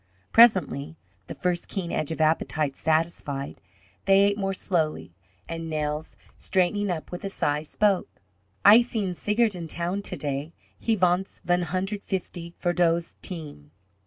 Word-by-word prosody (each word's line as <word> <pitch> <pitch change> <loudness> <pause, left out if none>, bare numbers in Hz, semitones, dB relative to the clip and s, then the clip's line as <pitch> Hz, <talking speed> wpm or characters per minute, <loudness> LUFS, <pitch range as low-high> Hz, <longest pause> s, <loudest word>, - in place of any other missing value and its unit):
Presently, 165 -9 +4 0.3
the - - -7
first 180 -1 -1
keen 185 -4 -4
edge 155 - -1
of 160 - -4
appetite 155 -2 +1
satisfied, 155 -3 -1 0.4
they 195 0 +6
ate 200 0 +3
more 195 -1 -1
slowly, 155 - -1 0.3
and 165 0 -5
Nels, 150 0 -3 0.2
straightening 190 +2 +1
up 160 -4 -4
with 180 - -6
a 195 - -2
sigh, 150 -6 0
spoke: 195 +5 +1 0.6
"Ay 215 +4 +9
seen 215 -6 -2
Seigert 210 +4 +1
in 170 -3 -6
town 175 +5 -1
ta - - -4
day. 145 +2 -3 0.3
Ha 225 - +2
vants 185 0 +1
von 175 0 +2
hundred 190 +3 -2
fifty 175 -3 -5
fer 175 -1 0
dose 170 -1 +1
team." 150 - -7
175 Hz, 150 wpm, -26 LUFS, 155-195 Hz, 0.6 s, Ay